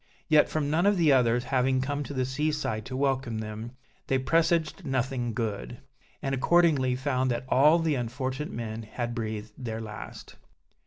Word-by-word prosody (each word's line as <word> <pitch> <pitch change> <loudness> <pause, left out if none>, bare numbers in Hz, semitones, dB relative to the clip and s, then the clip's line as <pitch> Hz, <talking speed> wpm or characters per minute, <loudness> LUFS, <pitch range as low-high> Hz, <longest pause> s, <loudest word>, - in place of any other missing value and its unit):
Yet, 155 -2 +5
from 150 -2 -1
none 170 +5 +3
of 205 -1 +3
the 165 -4 +4
others 120 -2 +3
having 130 0 +1
come 145 +2 -2
to 145 - -6
the 130 -1 +1
sea 150 +4 0
side 110 -8 -3
to 130 - -4
welcome 130 -4 0
them, 110 +2 -6 0.3
they 135 - +2
presaged 165 +5 +1
nothing 130 -3 -1
good; 105 - -3 0.5
and 135 - -1
accordingly 140 -3 +3
found 130 -1 0
that 120 +1 -2
all 150 +6 +5
the 165 -2 +1
unfortunate 130 +3 -3
men 115 -1 -5
had 120 +2 -4
breathed 110 -2 -4
their 115 -3 -4
last. 110 -1 -9
130 Hz, 170 wpm, -28 LUFS, 115-145 Hz, 0.5 s, Yet